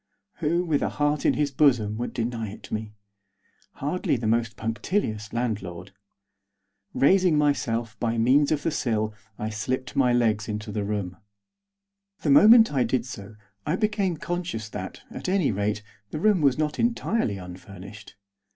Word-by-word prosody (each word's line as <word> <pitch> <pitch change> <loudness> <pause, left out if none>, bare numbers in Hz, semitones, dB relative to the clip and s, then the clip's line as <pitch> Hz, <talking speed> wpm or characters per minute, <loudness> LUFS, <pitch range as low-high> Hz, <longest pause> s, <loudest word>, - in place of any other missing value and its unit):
Who, 170 +2 +1
with 155 -4 +1
a - - 0
heart 145 0 0
in - - +3
his 145 -1 0
bosom, 125 -7 +3
would 120 - -3
deny 115 -2 -3
it 105 - -11
me? 110 -1 -4 0.8
Hardly 150 +4 -1
the 115 - -5
most 115 -1 0
punctilious 110 - -2
landlord. 100 -6 -3 1.0
Raising 180 +2 +4
myself 115 -7 0
by 115 -1 -1
means 135 +6 +4
of 150 -2 0
the 165 - 0
sill 110 -6 -1 0.2
I 110 +1 -3
slipped 130 +5 -3
my 130 -3 +3
legs 110 -3 +1
into 105 0 -4
the 105 0 -2
room. 100 -3 -3 1.1
The 145 - +2
moment 220 - +7
I 130 -3 +3
did 120 0 0
so 110 -4 -9 0.3
I 155 - 0
became 205 -4 0
conscious 170 -11 -4
that, 95 -2 -7
at - - -5
any 190 -6 +2
rate, 105 +1 -1 0.3
the 155 - -4
room 205 -1 +3
was 140 -3 +3
not 150 -1 -1
entirely 230 - 0
unfurnished. 95 +3 -11
120 Hz, 155 wpm, -25 LUFS, 105-150 Hz, 1.1 s, moment